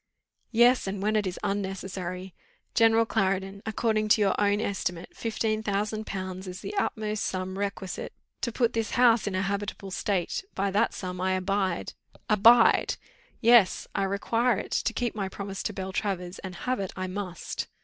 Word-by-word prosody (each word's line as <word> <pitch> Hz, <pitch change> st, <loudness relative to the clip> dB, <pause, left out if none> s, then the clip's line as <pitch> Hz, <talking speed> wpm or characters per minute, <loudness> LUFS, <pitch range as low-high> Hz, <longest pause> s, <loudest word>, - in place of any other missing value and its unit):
"Yes, 240 Hz, 0 st, +4 dB
and 195 Hz, +1 st, -3 dB
when 210 Hz, +2 st, +1 dB
it 210 Hz, -2 st, +2 dB
is 180 Hz, -, -4 dB
unnecessary. 190 Hz, -2 st, -3 dB, 0.4 s
General 225 Hz, -1 st, +5 dB
Clarendon, 195 Hz, -1 st, -1 dB
according 220 Hz, -1 st, +1 dB
to 215 Hz, 0 st, +4 dB
your 195 Hz, -2 st, +4 dB
own 205 Hz, 0 st, +3 dB
estimate, 180 Hz, -4 st, -3 dB
fifteen 220 Hz, -1 st, -1 dB
thousand 215 Hz, +1 st, -2 dB
pounds 190 Hz, 0 st, -5 dB
is 180 Hz, 0 st, -7 dB
the -, -, -5 dB
utmost 215 Hz, -, -1 dB
sum 185 Hz, 0 st, -3 dB
requisite 195 Hz, -1 st, -4 dB, 0.3 s
to 235 Hz, -, -1 dB
put 235 Hz, 0 st, +1 dB
this 225 Hz, -1 st, -1 dB
house 235 Hz, -4 st, +5 dB
in 195 Hz, -, -1 dB
a 185 Hz, -, +1 dB
habitable 200 Hz, 0 st, -3 dB
state 190 Hz, -, -1 dB
by 195 Hz, 0 st, 0 dB
that 210 Hz, +4 st, +2 dB
sum 180 Hz, -1 st, -5 dB
I 190 Hz, 0 st, +1 dB
abide!" 185 Hz, -1 st, -1 dB, 0.4 s
"Abide!" 230 Hz, +3 st, +6 dB, 0.5 s
"Yes, 235 Hz, -4 st, +5 dB
I -, -, 0 dB
require 225 Hz, +4 st, +1 dB
it, -, -, -6 dB
to -, -, +1 dB
keep 240 Hz, 0 st, -2 dB
my 195 Hz, -3 st, -3 dB
promise 195 Hz, 0 st, -5 dB
to -, -, -2 dB
Beltraver's, 190 Hz, -1 st, -3 dB
and 185 Hz, -2 st, -7 dB
have 255 Hz, -3 st, 0 dB
it 195 Hz, -2 st, -3 dB
I 185 Hz, -, -3 dB
MUST." 185 Hz, -2 st, -4 dB
200 Hz, 170 wpm, -27 LUFS, 190-220 Hz, 0.5 s, Abide